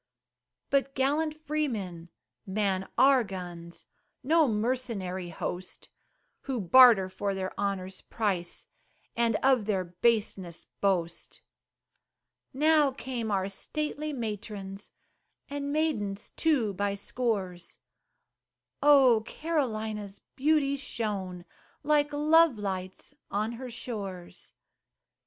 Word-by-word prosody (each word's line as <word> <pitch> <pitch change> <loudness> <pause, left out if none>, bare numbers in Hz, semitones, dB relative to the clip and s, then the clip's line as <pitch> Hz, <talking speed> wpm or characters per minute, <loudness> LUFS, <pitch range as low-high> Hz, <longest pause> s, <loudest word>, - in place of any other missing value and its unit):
But 275 -1 +1
gallant 305 +3 0
freemen 210 - -2 0.4
man 190 -1 -1
our 265 -2 +6
guns 175 -4 -8 0.4
No 315 +3 +4
mercenary 210 -6 -2
host, 180 +2 -6 0.6
Who 265 -3 -2
barter 220 0 +7
for 195 +1 -3
their 190 -1 -3
honor's 195 -2 -3
price, 190 -6 -2 0.5
And 230 -1 +2
of 260 -5 +4
their 195 -3 0
baseness 185 -1 -1
boast. 175 -4 -1 1.1
Now 300 +1 +4
came 255 -4 -4
our 195 -2 0
stately 300 +8 -4
matrons, 210 -5 -5 0.6
And 285 0 -3
maidens 220 -11 -1
too 265 -11 +1
by 200 +1 -1
scores; 200 -5 -3 1.0
Oh! 270 -6 +6
Carolina's 220 -10 -2 0.2
beauty 280 0 +2
shone 195 -9 -4 0.4
Like 295 0 +2
love 305 -1 +4
lights 190 -2 -5 0.2
on 215 +3 -1
her 250 +2 -7
shores. 200 -7 -7
215 Hz, 95 wpm, -29 LUFS, 190-275 Hz, 1.1 s, barter